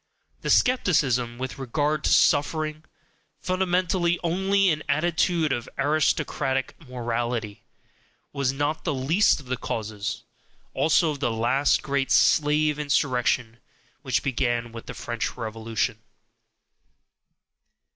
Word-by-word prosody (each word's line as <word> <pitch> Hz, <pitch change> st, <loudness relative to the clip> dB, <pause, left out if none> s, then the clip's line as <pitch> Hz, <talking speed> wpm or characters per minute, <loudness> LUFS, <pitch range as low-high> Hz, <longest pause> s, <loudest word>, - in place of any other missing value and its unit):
The -, -, -4 dB
skepticism 140 Hz, -, +2 dB
with 130 Hz, +1 st, -5 dB
regard 145 Hz, +4 st, -1 dB
to -, -, +2 dB
suffering, 155 Hz, +1 st, +2 dB, 0.5 s
fundamentally 180 Hz, -1 st, 0 dB
only 190 Hz, +2 st, +2 dB
an 155 Hz, 0 st, -2 dB
attitude 160 Hz, 0 st, +1 dB
of 120 Hz, -2 st, -4 dB
aristocratic 135 Hz, -2 st, 0 dB, 0.2 s
morality, 120 Hz, -3 st, -3 dB, 0.7 s
was 140 Hz, -2 st, 0 dB
not 145 Hz, +3 st, -2 dB
the -, -, -1 dB
least 160 Hz, +12 st, +3 dB
of 145 Hz, -, -12 dB
the 130 Hz, 0 st, -3 dB
causes, 110 Hz, -3 st, -4 dB, 0.5 s
also, 160 Hz, +1 st, +3 dB
of 145 Hz, -, -6 dB
the 130 Hz, -, 0 dB
last 120 Hz, +5 st, +1 dB
great 140 Hz, -1 st, -1 dB
slave 150 Hz, 0 st, +3 dB
insurrection 125 Hz, -4 st, 0 dB, 0.4 s
which 130 Hz, -4 st, -1 dB
began 120 Hz, -3 st, -1 dB
with 115 Hz, 0 st, -10 dB
the -, -, -7 dB
French 120 Hz, 0 st, -4 dB
Revolution. 110 Hz, -1 st, -3 dB
140 Hz, 110 wpm, -25 LUFS, 120-155 Hz, 0.7 s, least